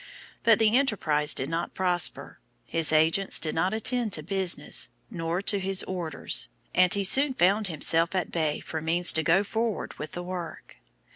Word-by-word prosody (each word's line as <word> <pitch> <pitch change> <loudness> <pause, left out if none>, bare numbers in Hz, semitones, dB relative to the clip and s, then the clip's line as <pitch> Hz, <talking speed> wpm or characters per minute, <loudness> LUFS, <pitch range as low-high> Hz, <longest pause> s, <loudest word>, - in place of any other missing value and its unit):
But 230 -2 +4
the 220 0 +2
enterprise 160 - +1
did 130 - -3
not 165 +2 -4
prosper, 180 -2 -1 0.3
his 165 -2 0
agents 160 +5 +3
did 155 - -2
not 175 +4 0
attend 225 0 -1
to 155 - -2
business, 190 +1 -1 0.2
nor 170 0 -3
to 200 0 0
his 195 0 0
orders, 175 -4 +1 0.3
and 180 -1 +3
he 200 -1 +2
soon 265 +7 +3
found 200 +3 +2
himself 165 +2 +2
at 185 - -2
bay 155 -3 -2
for 160 - -6
means 170 +2 +3
to 160 - +1
go 170 +5 +2
forward 225 +1 -3
with 155 - -7
the 175 - -6
work. 180 -2 -8
180 Hz, 170 wpm, -26 LUFS, 165-200 Hz, 0.3 s, But